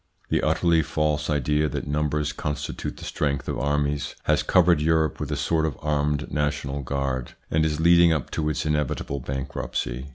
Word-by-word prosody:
The - - +2
utterly 85 -2 +3
false 75 0 -1
idea 75 +1 +1
that - - -4
numbers 75 0 -1
constitute 75 0 -4
the - - -9
strength 70 -2 -1
of - - -2
armies 70 0 0
has - - +2
covered 85 -3 +4
Europe 80 -2 +2
with - - -4
a - - 0
sort 80 -2 +1
of 75 -6 -1
armed 75 0 -1
national 70 -1 -1
guard, 70 -2 -2 0.2
and 80 0 +3
is 75 -1 0
leading 85 0 +6
up 75 -5 -1
to 75 -1 -1
its 75 - -2
inevitable 75 -2 -1
bankruptcy. 65 0 -4
75 Hz, 170 wpm, -25 LUFS, 70-75 Hz, 0.2 s, leading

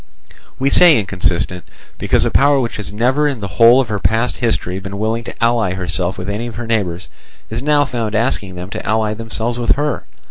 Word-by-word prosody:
We 135 +1 0
say 175 -4 +7
inconsistent, 90 -3 -2 0.4
because - - +2
a - - 0
power 140 0 +4
which 120 -3 -3
has 105 -2 -5
never 130 +8 +1
in 140 -5 -2
the 100 - -4
whole 120 +3 +8
of 130 -5 0
her 105 -2 -2
past 115 +5 0
history 95 -6 -1
been 95 +1 -7
willing 110 +2 -1
to - - -7
ally 115 -5 +1
herself 90 0 -1
with 90 0 -6
any 105 +4 -3
of 115 - -8
her 120 +1 -5
neighbours, 95 -6 -2 0.4
is 115 +1 -3
now 145 0 +2
found 115 -5 -3
asking 105 -5 0
them 90 +2 -8
to - - -5
ally 110 -1 0
themselves 115 +2 -3
with 120 - +2
her. 145 +1 -2
110 Hz, 210 wpm, -17 LUFS, 100-120 Hz, 0.4 s, whole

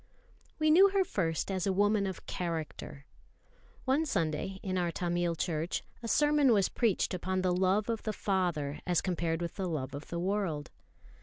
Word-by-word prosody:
We 310 0 +3
knew 380 +5 +7
her 390 0 +2
first 165 - -1
as 190 -1 -1
a - - +3
woman 205 +1 +2
of 190 - -6
character. 160 -4 -5 0.8
One 285 +4 +2
Sunday, 170 - -1
in 185 -2 -2
our 175 -2 +1
Tamil 175 0 -1
church, 165 0 -2 0.2
a 230 - -5
sermon 295 +1 +4
was 200 -3 +3
preached 220 -5 +1
upon 185 +1 -1
the 180 -1 +2
love 190 +3 +2
of 230 -2 -1
the 215 - -2
Father 175 -9 -1
as 175 -2 +3
compared 170 -2 -1
with 170 - -5
the 190 -3 -2
love 140 -4 -3
of 145 +1 -7
the 170 - -4
world. 180 -5 -1
185 Hz, 175 wpm, -31 LUFS, 170-205 Hz, 0.8 s, knew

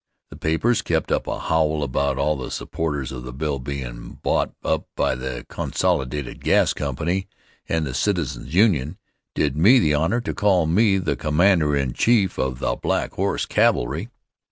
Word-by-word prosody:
The - - -9
papers 80 +10 +1
kept - - -1
up - - 0
a - - -2
howl 80 -2 +1
about 70 0 0
all 75 +3 +1
the 65 - -6
supporters 75 -5 -3
of 65 -2 -6
the 60 0 -7
bill 70 +2 -2
bein' 65 -3 -6
bought - - +1
up 80 - -1
by - - +1
the 65 -1 -5
Consolidated 75 -7 -2
Gas - - +3
Company, 85 +8 -2 0.4
and 80 -1 0
the 65 - -4
Citizens' 85 -4 -1
Union 85 - +2 0.4
did 70 -2 +1
me 100 - +6
the 75 -11 +3
honor 80 +11 +1
to 120 - -4
call 95 -5 +2
me 95 +5 +3
the 90 -5 -1
commander 75 -1 +2
in 65 -3 -1
chief 110 -6 +2
of 65 -1 -1
the - - -1
"Black - - -1
Horse - - -1
Cavalry." 75 - +1
75 Hz, 170 wpm, -22 LUFS, 70-90 Hz, 0.4 s, me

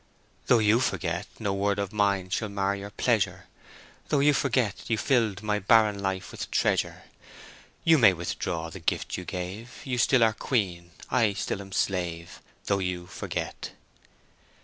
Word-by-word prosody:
"Though 125 - +6
you 110 +1 +4
forget, 90 -5 -1
No 100 -3 -1
word 100 +1 0
of 100 0 -3
mine 100 -3 +1
shall 110 +2 -1
mar 100 0 0
your 100 0 -7
pleasure; - - 0 0.6
Though 150 - +2
you 145 +1 +5
forget, 130 -7 0
You 115 - +2
filled 110 -5 +1
my 105 -1 0
barren 105 0 +4
life 95 -1 -3
with - - -6
treasure, - - 0 0.8
You 160 -2 +5
may 110 -5 +8
withdraw 85 -1 -3
the 95 - -8
gift 80 - -1
you 90 - -6
gave; 95 +7 -6
You 130 -4 -2
still 125 0 +4
are 110 -1 +4
queen, 95 -8 -1 0.2
I 115 -5 +3
still 100 - -3
am 95 0 -11
slave, 85 -3 -2 0.2
Though 100 -1 +1
you 90 -2 -3
forget." 95 +2 -5
100 Hz, 160 wpm, -27 LUFS, 95-115 Hz, 0.8 s, may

